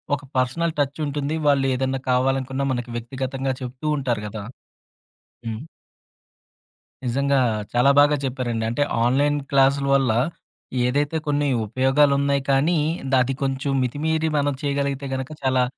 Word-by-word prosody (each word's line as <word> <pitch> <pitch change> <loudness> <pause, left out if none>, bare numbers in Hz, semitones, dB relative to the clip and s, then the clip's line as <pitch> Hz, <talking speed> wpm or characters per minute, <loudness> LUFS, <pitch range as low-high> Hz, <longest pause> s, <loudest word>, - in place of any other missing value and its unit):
ఒక 145 - -9 0.2
పర్సనల్ 160 +7 0
టచ్చుంటుంది, 145 +1 -1
వాళ్ళు 140 -2 +3
ఏదన్నా 130 +1 -1
కావాలనుకున్నా 135 +1 0
మనకి 120 -1 -4
వ్యక్తిగతంగా 130 +2 -3
చెప్తూ 130 +3 -7
ఉంటారు 120 -6 -1
కదా! 105 0 -6 1.0
హ్మ్. 110 0 -4 1.4
నిజంగా 140 +3 +1 0.3
చాలా 120 +3 +4
బాగా 145 +1 +5
చెప్పారండి. 125 -3 -2
అంటే 120 +5 +1 0.2
ఆన్‌లైన్‌ 145 +4 +2
క్లాసుల 140 0 +3
వల్ల, 135 -4 +2 0.7
ఏదైతే 145 +5 0
కొన్ని 145 0 +1 0.2
ఉపయోగాలున్నయి 140 +4 +2
కానీ, 150 +6 +3 0.4
అది 130 +2 0
కొంచెం 135 +1 -1
మితిమీరి 160 +5 0
మనం 145 0 +1
చేయగలిగితే 140 -1 -1
గనుక 130 +2 -5
చాలా 130 -1 +3
135 Hz, 120 wpm, -23 LUFS, 130-145 Hz, 1.4 s, బాగా